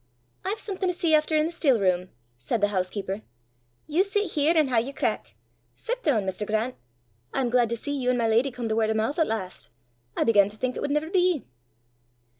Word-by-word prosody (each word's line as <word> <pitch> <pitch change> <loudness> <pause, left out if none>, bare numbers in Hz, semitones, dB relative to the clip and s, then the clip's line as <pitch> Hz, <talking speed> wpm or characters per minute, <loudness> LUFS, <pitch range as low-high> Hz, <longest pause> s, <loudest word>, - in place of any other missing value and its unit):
"I've 400 +3 -1
something 380 -3 -2
to 360 - -1
see 335 -2 +1
efter 310 0 +3
i' 305 - +3
the 325 - -1
still 275 -8 +2
room," 185 -1 +1 0.3
said 120 - -2
the 205 0 +2
housekeeper. 195 +1 -2 0.6
"You 325 +5 +2
sit 405 -2 -1
here 310 +3 +2
and 300 -4 +3
hae 230 -2 +4
yer 270 +4 -6
crack. - - -2 0.4
Sit - - -4
doon, 235 - +1
Mr. 190 +2 -3
Grant. 220 +4 0 0.6
I'm 255 -3 0
glaid 240 -2 +3
to 235 - -2
see 285 +5 -3
you 255 -3 -1
an' 250 - +2
my 230 -1 +1
leddy 230 +5 +3
come 245 -2 -5
to 220 - 0
word 220 -1 +2
o' 220 - +1
moo' 220 +5 0
at 320 - +2
last. 190 -5 -4 0.5
I - - +3
began 205 -3 +4
to 210 - -13
think 255 +2 -2
it - - -4
wud - - -2
never 300 +3 -1
be!" 360 -5 +2
250 Hz, 225 wpm, -26 LUFS, 215-315 Hz, 0.6 s, hae